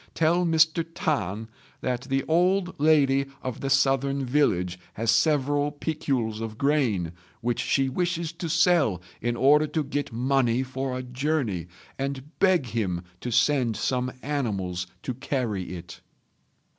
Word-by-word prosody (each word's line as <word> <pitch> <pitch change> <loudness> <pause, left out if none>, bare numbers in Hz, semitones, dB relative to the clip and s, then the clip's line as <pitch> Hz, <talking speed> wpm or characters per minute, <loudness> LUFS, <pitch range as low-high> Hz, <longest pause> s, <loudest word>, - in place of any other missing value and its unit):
Tell 170 +2 +3
Mr. 160 0 +3
T'an 110 - -1 0.3
that 125 0 -2
the 135 0 +1
old 180 +3 +2
lady 140 -3 +4 0.2
of 130 -2 -4
the 135 - -2
southern 135 0 +2
village 90 -10 +1 0.2
has 115 +1 +1
several 145 +3 +2
piculs 135 -7 -2
of 110 -1 -5
grain 125 - +1 0.3
which 120 0 -1
she 135 -1 +1
wishes 170 +3 -1
to 170 0 -5
sell 160 - +3 0.2
in 120 +1 0
order 150 +5 +5
to 155 0 -1
get 145 0 -3
money 125 0 +1
for 130 0 -3
a 130 - -4
journey, 125 - -1 0.3
and 140 +1 -4
beg 185 -7 +4
him 95 -6 -2 0.2
to 125 - -4
send 125 -1 +2
some 125 -1 -1
animals 100 -11 -2 0.2
to 130 - -2
carry 115 -9 -3
it." 85 0 -10
135 Hz, 140 wpm, -26 LUFS, 115-150 Hz, 0.3 s, order